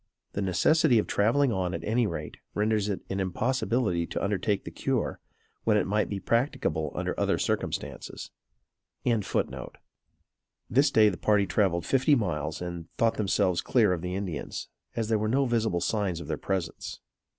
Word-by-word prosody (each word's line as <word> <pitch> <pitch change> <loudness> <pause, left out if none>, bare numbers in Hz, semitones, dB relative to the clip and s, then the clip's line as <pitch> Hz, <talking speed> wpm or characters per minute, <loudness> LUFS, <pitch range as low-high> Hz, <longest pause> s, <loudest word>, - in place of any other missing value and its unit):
The 100 - -2
necessity 120 - +4
of 105 - +2
traveling 120 +6 +2
on, 95 -4 -1
at 85 - -5
any 115 +1 +2
rate, 85 - -5 0.2
renders 105 0 +1
it 100 - -2
an 95 - -1
impossibility 105 -2 0
to - - -3
undertake 100 0 0
the - - -6
cure, - - -1 0.4
when 110 -2 +3
it 105 - +2
might 105 +2 +1
be 100 - -3
practicable 95 - 0
under - - -1
other - - +2
circumstances.] - - -3 0.7
This 110 - -2
day 110 -5 +6
the 90 - -4
party 105 -2 +3
travelled 90 -4 +1
fifty 135 - +4
miles 85 - -2
and 85 -2 -6
thought 115 -1 +2
themselves 95 -3 +2
clear 110 -7 +3
of 85 -1 -4
Indians, 90 -4 -4 0.3
as 115 -2 -1
there 110 -2 +2
were 110 +1 0
no 135 +4 +3
visible 110 -7 +1
signs 95 -2 0
of - - -8
their - - -1
presence. 95 -4 -3
105 Hz, 160 wpm, -28 LUFS, 90-115 Hz, 0.7 s, day